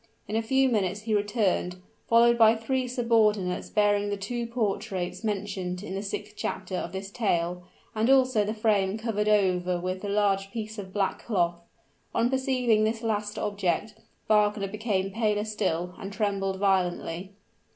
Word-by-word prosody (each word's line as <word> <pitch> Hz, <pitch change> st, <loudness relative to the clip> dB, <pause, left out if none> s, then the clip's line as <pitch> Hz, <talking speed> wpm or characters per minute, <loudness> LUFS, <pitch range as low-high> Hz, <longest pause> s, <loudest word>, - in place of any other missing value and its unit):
In 210 Hz, -, -3 dB
a 225 Hz, -, +2 dB
few 265 Hz, +4 st, +3 dB
minutes 205 Hz, -4 st, 0 dB
he 220 Hz, 0 st, -2 dB
returned, 205 Hz, -4 st, +1 dB, 0.3 s
followed 235 Hz, +1 st, +6 dB
by 225 Hz, -1 st, +6 dB
three 255 Hz, +3 st, -1 dB
subordinates 220 Hz, -6 st, +1 dB
bearing 205 Hz, -1 st, +2 dB
the 205 Hz, -, -2 dB
two 235 Hz, +4 st, -3 dB
portraits 200 Hz, -5 st, -2 dB
mentioned 195 Hz, -3 st, -3 dB
in 190 Hz, -, -6 dB
the 195 Hz, -, -2 dB
sixth 210 Hz, +1 st, -5 dB
chapter 190 Hz, -2 st, -4 dB
of -, -, -3 dB
this 195 Hz, +1 st, -6 dB
tale, 180 Hz, -5 st, 0 dB, 0.3 s
and 220 Hz, +3 st, +1 dB
also 255 Hz, -5 st, +4 dB
the 215 Hz, +2 st, -3 dB
frame 210 Hz, -2 st, +1 dB
covered 220 Hz, -2 st, -1 dB
over 180 Hz, -3 st, +2 dB
with 185 Hz, +1 st, -3 dB
the 205 Hz, -, -4 dB
large 200 Hz, -1 st, +1 dB
piece 215 Hz, 0 st, -5 dB
of 190 Hz, -2 st, -7 dB
black 195 Hz, -1 st, -1 dB
cloth. 175 Hz, -6 st, +1 dB, 0.6 s
On 235 Hz, +2 st, +2 dB
perceiving 255 Hz, -5 st, +2 dB
this 225 Hz, +1 st, -1 dB
last 210 Hz, -2 st, -2 dB
object, 205 Hz, 0 st, -1 dB, 0.3 s
Wagner 210 Hz, -1 st, +3 dB
became 200 Hz, -2 st, -1 dB
paler 210 Hz, -1 st, 0 dB
still, 180 Hz, -5 st, -2 dB
and 195 Hz, -, -6 dB
trembled 200 Hz, -2 st, -1 dB
violently. 185 Hz, -1 st, 0 dB
205 Hz, 160 wpm, -27 LUFS, 190-225 Hz, 0.6 s, followed